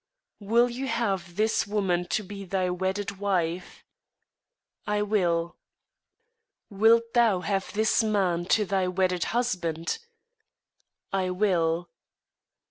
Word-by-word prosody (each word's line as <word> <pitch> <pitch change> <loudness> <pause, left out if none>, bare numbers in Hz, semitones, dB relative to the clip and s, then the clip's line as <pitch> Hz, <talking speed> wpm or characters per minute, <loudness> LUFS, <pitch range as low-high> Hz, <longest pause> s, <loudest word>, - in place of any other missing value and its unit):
"Wilt 235 +4 +2
thou 270 - -2
have 195 -8 -2
this 220 +1 +1
woman 190 -4 0
to 215 - -1
thy 190 -2 -3
wedded 190 +2 -3
wife?" 180 -3 -2 1.0
"I 210 0 +1
will." 170 -5 0 1.1
"Wilt 230 +3 +3
thou 225 -6 +3
have 195 0 -2
this 220 +3 +2
man 190 -5 +1
to 210 +3 +2
thy 190 -1 0
wedded 180 -1 0
husband?" 175 -9 -1 1.1
"I 190 -1 0
will." 175 -3 +1
195 Hz, 105 wpm, -27 LUFS, 180-210 Hz, 1.1 s, Wilt